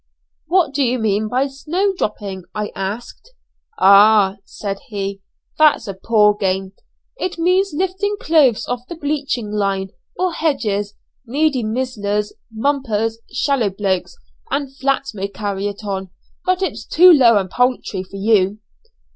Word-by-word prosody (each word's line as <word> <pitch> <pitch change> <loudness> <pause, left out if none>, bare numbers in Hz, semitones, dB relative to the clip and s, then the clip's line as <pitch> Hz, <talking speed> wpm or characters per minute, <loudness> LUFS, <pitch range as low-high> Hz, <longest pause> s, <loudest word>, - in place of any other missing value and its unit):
"What 350 -6 +2
do 285 - 0
you 255 -1 +2
mean 215 -2 0
by 255 +5 +1
'snow 330 +9 -1
dropping?'" 200 - -4
I 210 0 -3
asked. 220 - -6 0.5
"Oh!" 200 0 +6
said 200 -1 -5
he, 195 -2 -4 0.4
"that's 300 -7 +4
a 195 - -3
poor 210 +2 +3
game. 190 -1 -2 0.5
It 365 -5 -3
means 365 +4 +2
lifting 380 +4 -1
clothes 275 -8 +3
off 245 0 -2
the 345 - -5
bleaching 285 -8 -2
line, 195 -2 -1 0.3
or 365 -1 0
hedges. 210 -11 -1 0.3
Needy 285 +1 +1
mizzlers, 215 -3 -2 0.2
mumpers, 225 -3 -1
shallow 270 -7 +1
blokes, 195 -2 -2 0.3
and 275 -2 -3
flats 275 -1 -1
may 195 -1 -3
carry 200 0 -3
it 205 +1 -7
on, 190 -2 -4 0.4
but 370 +1 +1
it's - - -3
too 360 +3 +6
low 240 -7 +6
and 190 -2 -2
paltry 250 -6 0
for 190 +1 -10
you." 200 -1 +2
225 Hz, 140 wpm, -19 LUFS, 200-285 Hz, 0.5 s, Oh